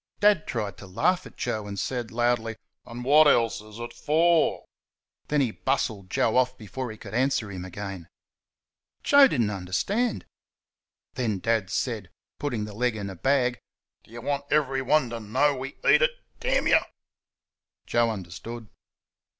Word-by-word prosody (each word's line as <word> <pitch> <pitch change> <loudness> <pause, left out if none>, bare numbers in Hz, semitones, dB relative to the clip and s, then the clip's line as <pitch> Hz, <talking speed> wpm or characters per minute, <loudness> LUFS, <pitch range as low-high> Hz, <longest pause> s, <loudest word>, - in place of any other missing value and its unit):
Dad 205 -5 +4
tried 105 -4 -3
to 100 - -10
laugh 180 - +1
at - - -17
Joe, 110 -4 -2
and 100 0 -6
said, 120 +1 -2
loudly, 120 -1 0 0.3
"And 120 +1 -7
what 150 +3 +7
else 115 -6 +3
is 105 0 -13
it 120 0 -6
for?" 165 +2 +2 0.6
Then 150 -1 +2
he 125 -5 +1
bustled 110 -7 -2
Joe 110 +5 +1
off 130 0 +2
before 120 +4 -6
he 110 - -8
could 100 -2 -10
answer 125 -4 +1
him 90 -2 -6
again. 95 -1 -7 1.0
Joe 280 -1 +7
did 135 - 0
n't 105 -2 +1
understand. 105 - -1 0.9
Then 115 -5 -1
Dad 110 -1 0
said 110 -4 -2 0.3
(putting 120 -7 -2
the 105 - -9
leg 120 +2 0
in 100 -2 -5
a - - -9
bag): 125 +3 +1 0.4
"Do - - -24
you 120 +1 -9
want 140 +2 -2
everyone 135 -2 +2
to 115 - -4
know 130 +7 +1
we 135 +1 -6
eat - - +6
it, - - +4 0.3
you?" - - +4 1.1
Joe 120 -1 +2
understood. 110 +3 -7
120 Hz, 160 wpm, -26 LUFS, 105-135 Hz, 1.1 s, what